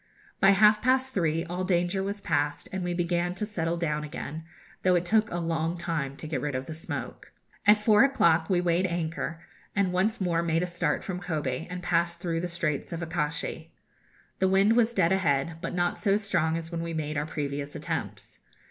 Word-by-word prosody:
By 195 - +6
half 210 +2 +6
past 260 +1 +2
three 165 -2 0
all 180 +2 -3
danger 180 +1 +1
was 200 +1 -3
past, 145 -3 -1
and 190 -1 -3
we 175 0 -1
began 175 0 0
to 210 - -2
settle 170 -5 -2
down 150 -3 -1
again, 150 +1 -6 0.4
though 185 -1 +4
it 175 0 +1
took 215 +3 +3
a 175 - -3
long 165 0 -1
time 165 -5 -2
to - - -8
get 150 -5 -2
rid 145 -2 -2
of 130 +1 -3
the 160 - -6
smoke. 160 - -6 0.4
At 210 +1 +8
four 210 +2 +5
o'clock 170 -12 +3
we 180 -2 +3
weighed 180 +1 +2
anchor, 165 -1 -3 0.3
and 195 -3 +1
once 210 +6 +1
more 175 -3 +1
made 165 0 +1
a - - +1
start 175 -1 -1
from 180 -2 -4
Kobe, 155 -4 -3
and 180 0 -6
passed 170 0 +1
through 170 -2 -1
the 180 - -2
Straits 165 -4 -2
of 170 0 -4
Akashi. 160 -2 -3 0.7
The 190 - +3
wind 195 +4 +4
was 235 0 +3
dead 165 - +3
ahead, 165 -4 +1
but - - -4
not 175 0 0
so 200 -1 +3
strong 170 -6 0
as 165 0 -6
when 170 -1 -3
we 165 -1 -4
made 150 -1 -3
our 145 +1 -1
previous 145 -2 -4
attempts. - - -5
170 Hz, 205 wpm, -28 LUFS, 160-190 Hz, 0.7 s, At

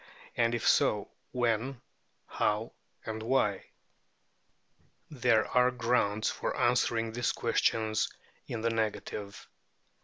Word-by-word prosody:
and 115 0 +2
if 115 - -1
so, - - +3 0.2
when, 120 +1 0 0.5
how, 105 +2 -1 0.3
and 110 0 -4
why? 110 -5 +1 1.5
There 120 -5 +3
are 125 0 +3
grounds 115 -4 +1
for - - -3
answering 115 -2 +2
these 120 +1 0
questions 110 -1 +1 0.4
in 115 - -4
the 115 +1 +1
negative. 105 -2 -3
115 Hz, 100 wpm, -30 LUFS, 110-120 Hz, 1.5 s, so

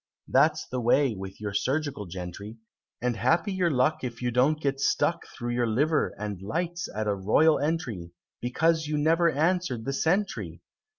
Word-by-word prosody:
That's - - +3
the 125 0 -3
way 125 +2 +3
with 95 -1 -8
your 105 -2 -4
surgical 135 -1 -1
gentry! 95 +5 -7 0.5
And 125 -1 +1
happy 170 - +1
your 180 -2 +1
luck 135 +1 +1
If 120 -2 -5
you 125 -1 -1
don't 135 +6 +2
get 140 -2 -1
stuck 155 +4 +1
Through 120 -1 -5
your 120 0 +1
liver 150 +8 +1
and 105 -3 -5
lights 170 - -3
at 110 0 -1
a 105 - +1
royal 110 +11 +3
entry, 130 - -2 0.3
Because 160 +6 +1
you 150 0 -1
never 165 +3 +3
answer'd 160 -5 0
the 135 - -2
sentry! 185 +8 -1
135 Hz, 170 wpm, -27 LUFS, 110-160 Hz, 0.5 s, That's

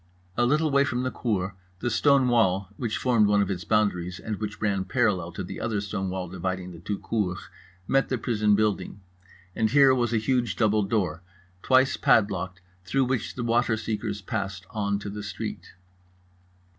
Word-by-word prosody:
A 120 0 +2
little 155 +3 +2
way 140 0 +4
from 125 -2 -1
the 130 - -1
cour, 100 -5 -2 0.2
the 120 +5 -2
stone 140 +2 +4
wall 95 -6 +2
(which 120 -7 -2
formed 115 -5 +3
one 105 0 +3
of 100 - -3
its 90 -2 -3
boundaries 90 -4 0
and 110 -2 -4
which 105 0 -5
ran 100 -3 0
parallel 95 -5 0
to 95 - -5
the 90 - -7
other 110 -3 -1
stone 100 -2 -3
wall 90 0 -3
dividing 95 +1 -4
the 85 - -10
two 100 +4 -3
cours) 95 -6 -1 0.5
met 135 0 +2
the 130 - 0
prison 105 -3 +2
building; 100 -2 -1 0.6
and 110 -1 +1
here 135 0 +6
was 120 -3 +1
a 115 - +2
huge 120 -3 0
double 110 0 +2
door, 95 -6 -1 0.4
twice 130 +3 +3
padlocked, 95 -4 +2 0.2
through 135 +8 +1
which 125 -3 -2
the 125 - -3
waterseekers 110 -3 -1
passed 100 -3 -3
on 100 -3 -1
to 100 - -7
the 105 +1 -6
street. 100 -2 -6
105 Hz, 180 wpm, -26 LUFS, 95-120 Hz, 0.6 s, here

